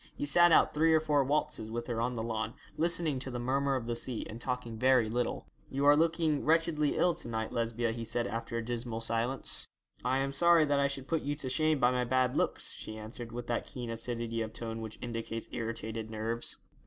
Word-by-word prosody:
He -, -, -2 dB
sat 175 Hz, +4 st, +6 dB
out -, -, +5 dB
three 160 Hz, +1 st, +4 dB
or -, -, +5 dB
four 150 Hz, -3 st, +2 dB
waltzes 135 Hz, -5 st, -1 dB
with 120 Hz, +1 st, -3 dB
her 115 Hz, -2 st, -2 dB
on 125 Hz, +1 st, -1 dB
the 110 Hz, -, -2 dB
lawn, 110 Hz, 0 st, -3 dB, 0.2 s
listening 165 Hz, -4 st, +2 dB
to 130 Hz, -, -5 dB
the 125 Hz, -, -4 dB
murmer 135 Hz, +3 st, +1 dB
of 125 Hz, -3 st, -2 dB
the 120 Hz, 0 st, -2 dB
sea, 120 Hz, 0 st, -3 dB
and 115 Hz, +2 st, -8 dB
talking 125 Hz, -2 st, -3 dB
very 125 Hz, 0 st, +4 dB
little. 120 Hz, +2 st, -2 dB, 0.2 s
'You 140 Hz, +1 st, -1 dB
are 145 Hz, 0 st, +8 dB
looking 160 Hz, -1 st, +2 dB
wretchedly 160 Hz, -2 st, +2 dB
ill 175 Hz, -1 st, +4 dB
to -, -, -6 dB
night, 110 Hz, -1 st, -3 dB
Lesbia,' 115 Hz, 0 st, 0 dB
he 115 Hz, 0 st, -4 dB
said, 120 Hz, +1 st, 0 dB
after 115 Hz, 0 st, -3 dB
a 115 Hz, -, -3 dB
dismal 120 Hz, -1 st, -3 dB
silence. 115 Hz, +3 st, -1 dB, 0.4 s
'I 130 Hz, +1 st, +2 dB
am 135 Hz, 0 st, -1 dB
sorry 170 Hz, +2 st, +5 dB
that 145 Hz, -1 st, +2 dB
I 140 Hz, -, +3 dB
should 140 Hz, -1 st, -5 dB
put 160 Hz, +3 st, 0 dB
you 145 Hz, +1 st, -2 dB
to 140 Hz, -3 st, -4 dB
shame 155 Hz, +4 st, +2 dB
by 125 Hz, -1 st, +4 dB
my 125 Hz, 0 st, +1 dB
bad 130 Hz, 0 st, +1 dB
looks,' -, -, 0 dB
she 110 Hz, -, -7 dB
answered, 115 Hz, +2 st, -7 dB
with 120 Hz, +1 st, -5 dB
that 120 Hz, 0 st, -2 dB
keen 120 Hz, -4 st, -5 dB
acidity 115 Hz, 0 st, -2 dB
of 110 Hz, 0 st, -4 dB
tone 115 Hz, -1 st, -5 dB
which 110 Hz, -1 st, -7 dB
indicates 115 Hz, -1 st, -4 dB
irritated 115 Hz, -1 st, -4 dB
nerves. 110 Hz, +2 st, -1 dB
125 Hz, 225 wpm, -31 LUFS, 115-145 Hz, 0.4 s, are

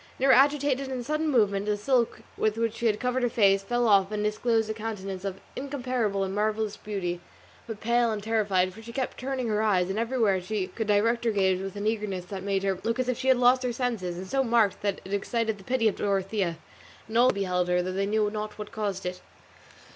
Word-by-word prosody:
In 260 Hz, -, 0 dB
her 270 Hz, -, +6 dB
agitation 275 Hz, 0 st, +3 dB
and 255 Hz, -2 st, -4 dB
sudden 305 Hz, +3 st, 0 dB
movement 205 Hz, -6 st, +2 dB
the 210 Hz, 0 st, +1 dB
silk 240 Hz, +2 st, +1 dB
with 215 Hz, 0 st, 0 dB
which 230 Hz, -1 st, 0 dB
she 235 Hz, -, +1 dB
had 210 Hz, -1 st, +1 dB
covered 250 Hz, +1 st, 0 dB
her 245 Hz, -, +2 dB
face 195 Hz, -4 st, +4 dB
fell 240 Hz, +4 st, 0 dB
off 200 Hz, -2 st, +4 dB
and 210 Hz, 0 st, -2 dB
disclosed 220 Hz, +1 st, +1 dB
a 220 Hz, -, -2 dB
countenance 195 Hz, -4 st, -5 dB
of 195 Hz, -1 st, -4 dB, 0.2 s
incomparable 250 Hz, -7 st, -1 dB
and 190 Hz, 0 st, -3 dB
marvellous 215 Hz, 0 st, 0 dB
beauty, 185 Hz, -5 st, -4 dB, 0.5 s
but 225 Hz, -2 st, -7 dB
pale 235 Hz, 0 st, +2 dB
and 210 Hz, -2 st, -4 dB
terrified; 200 Hz, -4 st, +1 dB
for 225 Hz, -, -12 dB
she 230 Hz, +1 st, -9 dB
kept 260 Hz, +1 st, -3 dB
turning 260 Hz, -1 st, -2 dB
her 215 Hz, -1 st, +1 dB
eyes, 190 Hz, -4 st, +2 dB
everywhere 220 Hz, -3 st, +1 dB
she 195 Hz, +1 st, -2 dB
could 220 Hz, +3 st, -5 dB
direct 230 Hz, +3 st, +2 dB
her -, -, +3 dB
gaze, 190 Hz, -3 st, +2 dB
with 195 Hz, 0 st, -6 dB
an 205 Hz, 0 st, -4 dB
eagerness 210 Hz, -4 st, -2 dB
that 190 Hz, +1 st, -6 dB
made 195 Hz, 0 st, -1 dB
her 195 Hz, -2 st, 0 dB
look 230 Hz, +1 st, 0 dB
as 255 Hz, -1 st, -1 dB
if 250 Hz, -, -1 dB
she 260 Hz, -, -3 dB
had 260 Hz, -1 st, +5 dB
lost 250 Hz, +1 st, +5 dB
her 250 Hz, -1 st, -1 dB
senses, 230 Hz, -8 st, -2 dB
and 185 Hz, -, -6 dB
so 270 Hz, +7 st, 0 dB
marked 230 Hz, -5 st, +2 dB
that 200 Hz, -1 st, -1 dB
it 190 Hz, -, -6 dB
excited 220 Hz, +1 st, -1 dB
the -, -, -13 dB
pity 245 Hz, 0 st, +1 dB
of 210 Hz, -, 0 dB
Dorothea 195 Hz, -3 st, -1 dB, 0.5 s
and 220 Hz, -, -8 dB
all 240 Hz, +2 st, +6 dB
who -, -, +2 dB
beheld 180 Hz, -2 st, 0 dB
her, 180 Hz, 0 st, +2 dB
though 185 Hz, -, -3 dB
they 195 Hz, +1 st, -1 dB
knew 210 Hz, 0 st, +1 dB
not 215 Hz, 0 st, -5 dB
what 210 Hz, -1 st, -7 dB
caused 200 Hz, -3 st, -3 dB
it. 180 Hz, 0 st, -4 dB
215 Hz, 235 wpm, -27 LUFS, 195-240 Hz, 0.5 s, her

